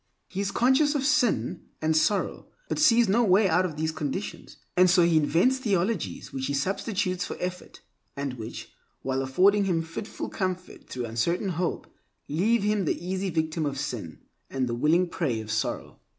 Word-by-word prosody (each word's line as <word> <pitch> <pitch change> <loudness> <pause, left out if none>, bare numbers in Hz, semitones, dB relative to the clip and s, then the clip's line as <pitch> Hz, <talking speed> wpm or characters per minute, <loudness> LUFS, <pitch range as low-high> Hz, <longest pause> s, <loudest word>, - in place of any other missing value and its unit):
He 195 - -3
is 200 - -1
conscious 265 +7 +3
of 275 -2 0
sin 250 - +1
and 160 0 +1
sorrow, 195 +6 +1 0.2
but - - -2
sees 240 -6 +5
no 225 +5 +3
way 195 0 +4
out 180 +1 +3
of 155 -4 -9
these 160 +1 0
conditions. 155 +5 -5 0.2
And 185 0 +6
so 175 0 +5
he 170 -1 +3
invents 170 - +3
theologies 195 - -1
which 130 -1 -2
he 140 - -1
substitutes 185 +3 -1
for - - -6
effort, 180 0 -6 0.3
and 140 -2 -3
which, 115 -2 -8 0.3
while 135 0 -1
affording 195 +10 +3
him 170 -4 +1
fitful 165 +6 -6
comfort 185 -2 -4
through 125 -2 -4
uncertain 120 - -1
hope, 175 0 -2 0.4
leave 200 +9 +1
him 210 -2 +1
the - - 0
easy 190 +2 -2
victim 160 -1 -1
of 140 -2 -2
sin, 105 - -5 0.3
and 130 -1 -1
the 120 - -2
willing 160 +9 +3
prey 140 -10 -1
of 110 0 -6
sorrow. 110 0 -3
180 Hz, 180 wpm, -27 LUFS, 145-200 Hz, 0.4 s, And